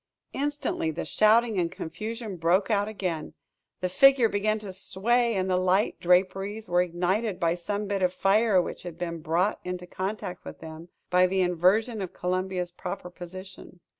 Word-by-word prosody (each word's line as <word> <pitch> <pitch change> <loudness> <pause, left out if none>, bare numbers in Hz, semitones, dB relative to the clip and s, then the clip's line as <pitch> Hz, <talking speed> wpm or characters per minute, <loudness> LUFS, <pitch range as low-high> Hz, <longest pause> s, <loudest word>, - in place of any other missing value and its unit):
Instantly, 285 - -1
the 160 +2 -4
shouting 220 -1 +3
and 170 -1 0
confusion 220 +4 -6
broke 180 +6 +2
out 205 -1 +2
again. 185 -7 -4 0.5
The 185 - +1
figure 265 +3 +5
began 215 +1 0
to 205 -3 -7
sway; 230 +5 +1
and 190 -1 0
the 185 -1 +2
light 185 +3 +1
draperies 195 +4 +1
were 175 0 +3
ignited 180 +4 -1
by 165 -1 +2
some 200 +4 -3
bit 200 -1 -2
of 180 -1 +3
fire 195 +2 +3
which 175 - -3
had 175 -2 -8
been 170 -1 -4
brought 170 +6 0
into 180 0 -5
contact 190 0 -5
with - - -9
them, 160 +1 -10 0.2
by 180 0 +5
the 190 +1 +1
inversion 190 +6 +2
of 185 - -5
Columbia's 180 0 -2
proper 180 0 -6
position. 185 +1 -10
185 Hz, 165 wpm, -27 LUFS, 180-210 Hz, 0.5 s, figure